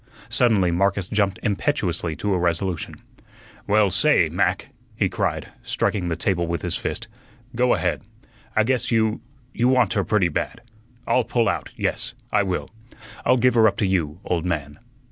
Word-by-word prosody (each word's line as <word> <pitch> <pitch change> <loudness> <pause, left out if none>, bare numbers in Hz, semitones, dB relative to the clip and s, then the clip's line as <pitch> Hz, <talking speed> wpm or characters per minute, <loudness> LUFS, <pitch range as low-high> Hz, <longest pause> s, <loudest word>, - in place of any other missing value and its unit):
Suddenly 115 -6 +3
Marcus 95 +1 +1
jumped 100 -2 0
impetuously 95 - -1
to 100 +6 -1
a 90 - +1
resolution. 85 0 -1 0.7
"Well, 105 -1 +3
say, - - +4
Mac," - - 0 0.3
he - - +1
cried, - - -2
striking 95 -4 -1
the 85 - -1
table 85 -3 0
with 85 -1 -3
his - - -2
fist, - - -3 0.5
"go 125 +1 +3
ahead. - - -1 0.5
I 110 - +4
guess 125 +2 0
you 110 -2 +1 0.3
you 120 - +2
want 125 -5 +3
her 100 - +1
pretty 100 -5 +2
bad. 115 +8 -3 0.4
I'll 125 - +2
pull 115 0 +1
out; - - -1
yes, 115 +2 -2 0.2
I 105 - +3
will. 95 -1 -3 0.5
I'll 125 - +4
give 125 +1 +3
her 115 -2 +6
up 100 - 0
to - - +1
you, 90 -4 -1
old 85 -2 0
man." 75 -5 -3
100 Hz, 165 wpm, -23 LUFS, 90-115 Hz, 0.7 s, her